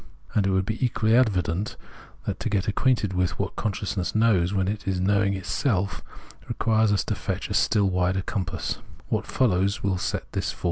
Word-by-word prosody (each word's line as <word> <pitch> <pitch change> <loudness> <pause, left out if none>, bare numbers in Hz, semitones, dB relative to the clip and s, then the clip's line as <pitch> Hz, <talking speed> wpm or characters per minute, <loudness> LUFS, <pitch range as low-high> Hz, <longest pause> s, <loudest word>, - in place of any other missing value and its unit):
And 100 -2 +2
it - - +2
will 95 0 +2
be 110 +6 -3
equally 115 -2 +2
evident 100 -5 +1 0.5
that 100 0 -3
to - - -2
get 100 -3 0
acquainted 105 -2 +1
with 90 -1 0
what - - -3
consciousness 100 -2 -2
knows 105 -6 +3
when 95 -2 +1
it 105 0 -3
is 95 -1 0
knowing 100 +1 +2
itself, 95 0 -1 0.5
requires 110 -1 +2
us 100 - +2
to - - -1
fetch - - -4
a - - 0
still 100 -2 +3
wider 90 0 +1
compass. 95 -4 -3
100 Hz, 150 wpm, -25 LUFS, 95-110 Hz, 0.5 s, knows